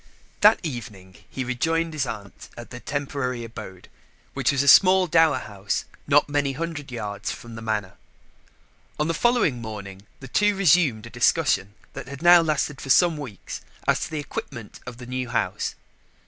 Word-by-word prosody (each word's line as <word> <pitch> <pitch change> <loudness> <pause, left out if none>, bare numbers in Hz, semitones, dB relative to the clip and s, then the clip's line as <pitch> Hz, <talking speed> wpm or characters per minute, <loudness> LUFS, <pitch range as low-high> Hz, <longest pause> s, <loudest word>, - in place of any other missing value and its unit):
That 210 +2 +6
evening 100 - -7
he 130 - -4
rejoined 165 +6 -1
his 140 -4 -1
aunt 100 -4 -8
at 120 - -10
their 125 - -7
temporary 135 -3 -3
abode, 110 -5 -10 0.5
which - - +1
was 140 -1 +1
a - - -3
small 185 +5 +7
dower 160 -4 +4
house 100 -4 -4 0.2
not 145 0 +4
many 145 -1 0
hundred 150 -2 -5
yards 105 -4 -4
from 120 -1 -9
the 115 - -8
Manor. 105 -4 -3 1.0
On 150 - +1
the 165 - 0
following 205 - +2
morning 100 -3 -8
the 130 - -10
two 205 +9 +2
resumed 160 - +3
a 115 - -11
discussion 120 - +1 0.2
that - - -8
had 140 +3 -9
now 175 0 +8
lasted 150 -3 -1
for 135 - -8
some 170 +4 +5
weeks 130 - -8 0.3
as - - +3
to - - -4
the 155 - -4
equipment 120 -6 -7
of 125 -1 -7
the 125 - -10
new 125 0 -4
house. 120 - -1
130 Hz, 175 wpm, -24 LUFS, 115-160 Hz, 1.0 s, now